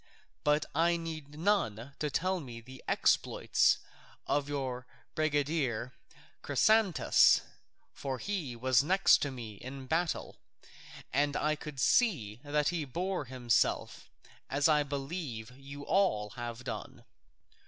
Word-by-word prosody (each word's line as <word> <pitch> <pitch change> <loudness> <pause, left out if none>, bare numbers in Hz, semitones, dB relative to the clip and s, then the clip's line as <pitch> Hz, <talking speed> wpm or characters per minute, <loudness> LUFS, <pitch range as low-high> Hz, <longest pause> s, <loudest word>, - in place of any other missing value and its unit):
But 150 +1 +2
I 170 +3 +3
need 155 -3 -7
none 140 - 0
to 150 - -1
tell 185 +6 0
me 120 -7 -8
the 130 +3 -13
exploits - - +3 0.5
of 145 0 0
your 130 -3 -3 0.3
brigadier 145 -6 0 0.5
Chrysantas; 215 -5 +4 0.8
he 175 -12 -3
was 130 0 +3
next 190 +5 +5
to 145 - 0
me 115 -6 -8
in 135 +4 -8
the - - -10
battle 165 +4 -2 0.7
and 145 +1 +2
I 155 0 +1
could 150 -3 -8
see 125 - +2
that 150 0 +1
he 170 -3 -2
bore 175 +4 -3
himself 125 -3 0 0.4
as 140 +1 +2
I 150 -2 +4
believe 140 -4 -4
you 140 +1 -9
all 105 - +1
have 120 +1 -6
done. 130 0 -7
145 Hz, 120 wpm, -31 LUFS, 125-160 Hz, 0.8 s, next